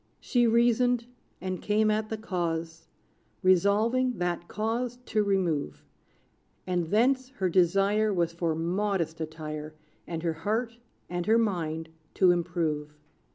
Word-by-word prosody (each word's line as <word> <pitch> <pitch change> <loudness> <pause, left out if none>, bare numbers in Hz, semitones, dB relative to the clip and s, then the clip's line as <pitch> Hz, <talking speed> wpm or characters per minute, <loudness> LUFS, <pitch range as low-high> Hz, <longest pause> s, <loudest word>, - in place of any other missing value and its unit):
She 240 -2 +2
reasoned, 235 +1 +3 0.3
and 185 -1 -4
came 215 +1 +2
at 215 0 -1
the 220 - -3
cause, 165 -5 -3 0.6
Resolving 215 +7 +3
that 175 -1 -2
cause 230 +3 -2
to 215 - +1
remove; 175 - -1 0.8
And 180 -2 -1
thence, 255 +5 +2
her 190 -4 0
desire 195 +4 +3
Was 170 -3 0
for 170 -2 -1
modest 170 -1 -1
attire, 155 -1 -6 0.3
And 165 -1 -4
her 165 -1 0
heart 225 +8 -2 0.3
and 175 +1 -3
her 225 +1 +5
mind 165 -7 -1 0.3
to 185 -2 +5
improve. 165 -4 -1
185 Hz, 125 wpm, -28 LUFS, 165-220 Hz, 0.8 s, her